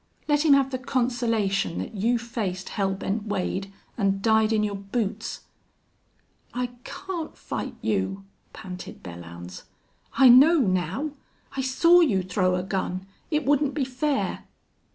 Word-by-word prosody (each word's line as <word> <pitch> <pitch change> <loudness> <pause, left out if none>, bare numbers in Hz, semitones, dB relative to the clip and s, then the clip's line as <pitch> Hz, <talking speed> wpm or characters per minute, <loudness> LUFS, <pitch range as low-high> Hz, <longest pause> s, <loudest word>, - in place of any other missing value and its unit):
Let 295 0 +3
him 295 - +7
have 270 -1 +2
the 255 - -2
consolation 235 -8 0
that - - -4
you 225 +4 +1
faced 215 -6 -4
Hell 195 -2 -1
Bent 205 +3 -3
Wade 195 0 -2 0.3
an' 195 -1 +2
died 220 +1 +3
in 215 -1 +2
your 205 -1 -1
boots!" 200 +2 -3 1.1
"I 250 0 -1
can't 355 -5 -6
fight - - -5
you!" 95 -2 -1 0.3
panted 180 -1 -9
Belllounds. 85 0 -9 0.5
"I 270 - +6
know 275 +8 +8
now!... 190 - 0 0.4
I 270 - 0
saw 335 +7 +5
you 210 - +3
throw 185 0 +1
a 180 - -1
gun! 185 -1 -3 0.2
It 300 -2 0
wouldn't 285 0 +2
be 285 -4 0
fair!" 270 +2 -1
220 Hz, 140 wpm, -25 LUFS, 190-265 Hz, 1.1 s, know